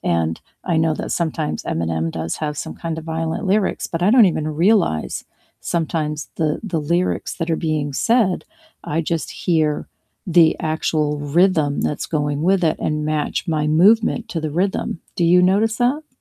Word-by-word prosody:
and 80 -1 0 0.3
I 170 - 0
know 160 -1 +2
that - - -5
sometimes 160 -2 -2
Eminem 80 0 -2
does 80 0 -3
have 150 -1 -3
some - - -5
kinda 165 -1 -4
violent 165 +5 -3
lyrics, 205 -1 0
but 165 +1 -2
I 190 - +4
don't 240 -3 +7
even 155 -1 -3 0.2
realize, 195 - +2 0.5
sometimes, 155 -2 -2
the 155 -2 0
the 165 - +2
lyrics 180 +1 0
that 165 -1 -3
are - - +2
being 150 -2 -1
said, 225 - +1 0.4
I 150 - -3 0.2
just 160 - -3
hear 155 -4 +1 0.5
the 160 -1 +7
actual 155 -1 0 0.3
rhythm 160 -6 +3
that's 150 - -2
going 145 -1 -1
with 195 -1 +3
it - - -3
and 150 0 -1
match 150 +4 -2
my 155 -2 0 0.2
movement 225 +2 +4
to 165 - -2
the 155 -1 -3
rhythm, 190 +1 0 0.3
do 175 - +1
you 180 - +6
notice 205 +5 +2
that? 275 +5 0
160 Hz, 170 wpm, -20 LUFS, 150-185 Hz, 0.5 s, don't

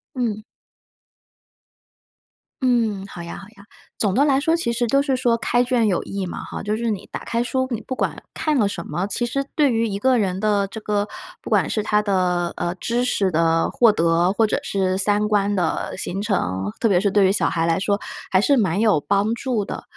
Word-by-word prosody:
嗯。 225 -4 -2 2.2
嗯， 225 -6 +1
好 175 - -9
呀 170 - -7
好 195 - -11
呀， 205 -2 -18 0.3
总 200 -3 +1
的 270 +6 +3
来 275 -2 +3
说 325 +3 +2
其 330 -9 -1
实 235 0 0
都 275 +4 +3
是 270 -2 0
说 240 -2 +2
开 245 +1 +1
卷 245 -3 +1
有 185 -4 +1
益 195 -1 -4
嘛 175 - -6
哈， - - -7
就 210 +1 -1
是 235 0 -1
你 210 -3 -4
打 - - -4
开 235 +1 0
书， 260 +1 -1
你 230 -3 -3
不 260 - -5
管 - - -2
看 305 -3 0
了 210 -4 +3
什 170 -4 -5
么， 175 +6 -2
其 240 - -1
实 275 +3 -1
对 290 -5 +3
于 230 0 +1
一 200 -1 -3
个 260 +2 +3
人 190 -3 0
的 205 -1 +1
这 220 - -8
个 205 0 -1 0.3
不 - - -8
管 - - +2
是 215 - -1
他 210 0 +2
的， 180 -4 0
呃， 175 0 -2
知 235 +6 -1
识 200 -6 +1
的 165 0 +2
获 235 -3 +5
得， 170 -1 +2
或 220 0 +2
者 - - 0
是 190 -1 0
三 205 +1 +2
观 205 -1 +1
的 180 -5 -1
形 190 +1 -3
成， 100 - -1
特 230 - +2
别 185 -4 +3
是 200 0 +1
对 200 0 +4
于 190 - +4
小 205 - +2
孩 165 -1 0
来 165 -1 +2
说， 200 +1 0 0.3
还 185 - +4
是 280 +8 +3
蛮 195 -5 +1
有 210 -10 +3
帮 200 +5 +1
助 235 -5 -2
的。 - - -6
210 Hz, 235 characters per minute, -22 LUFS, 190-235 Hz, 2.2 s, 获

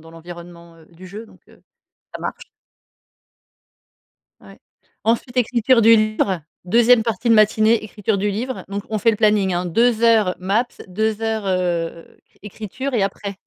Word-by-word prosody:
dans 165 +1 -15
l'environnement, 170 0 -12
heu, 160 - -19
du 175 +3 -15
jeu, 215 +5 -9
donc - - -21
heu, - - -22 0.5
ça - - -8
marche. - - -6 1.9
Ouais. - - -16 0.5
Ensuite, 235 +2 -1
écriture 245 0 +2
du 225 +1 +7
livre 215 -4 0 0.2
2e 235 +4 +4
partie 230 0 -2
de - - +6
matinée, 215 +1 +3
écriture 210 -1 -3
du 205 +1 -1
livre. 245 +6 -5
Donc 200 0 -4
on 215 - -1
fait 230 - +3
le 210 - -3
planning, 210 -3 +2
hein, 175 - -2
2 230 +5 +1
heures 220 -5 +3
maps 200 +7 0 0.2
2 215 +3 -2
heures, 220 -2 -2
heu, 175 -3 -3 0.2
écriture 220 +6 -6
et 215 - +1
après, 200 0 -4
215 Hz, 160 wpm, -20 LUFS, 185-230 Hz, 1.9 s, du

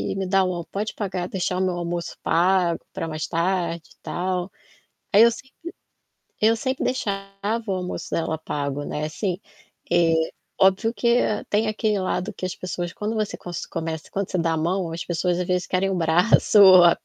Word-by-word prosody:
me 195 -1 -2
dar 195 0 +3
um 175 -2 -2
pode 210 +2 -3
pagar 185 -4 -3
deixar 180 -1 -1
o - - 0
meu 185 - 0
almoço 170 0 -3
pago 175 0 +2
pra 165 - -3
mais 155 -1 -3
tarde 170 -1 -1
e - - -35
tal". 180 +1 -2 0.6
Aí 205 - +8
eu 235 - +7
sempre 265 +3 -11 0.9
eu 225 +1 +4
sempre 260 +3 -2
deixava 200 -1 -2
o - - +1
almoço 180 -1 -4
dela 160 -1 -1
pago, 145 -2 -3
né, 150 - -3
assim, 180 +4 -3 0.5
eh, 170 -1 +4 0.5
óbvio 195 +4 +4
que 235 0 +3 0.3
tem 215 +1 +2
aquele 215 -1 0
lado 185 +2 -2
que - - -6
as 185 - -4
pessoas 175 -1 -4
quando 210 +3 -3
você 215 -2 -1
cos 175 -1 -6
começa, 165 -1 -5
quando 200 -1 -3
você - - -1
dá 165 -1 +1
a - - -1
mão 170 +1 -1
as 165 - -4
pessoas 175 +1 0
às 180 - -1
vezes 180 0 0
querem 185 +1 +1
o - - 0
braço 175 +6 +4
ou 185 -2 +9
a 170 - +6
perna. - - -36
185 Hz, 195 wpm, -24 LUFS, 170-200 Hz, 0.9 s, ou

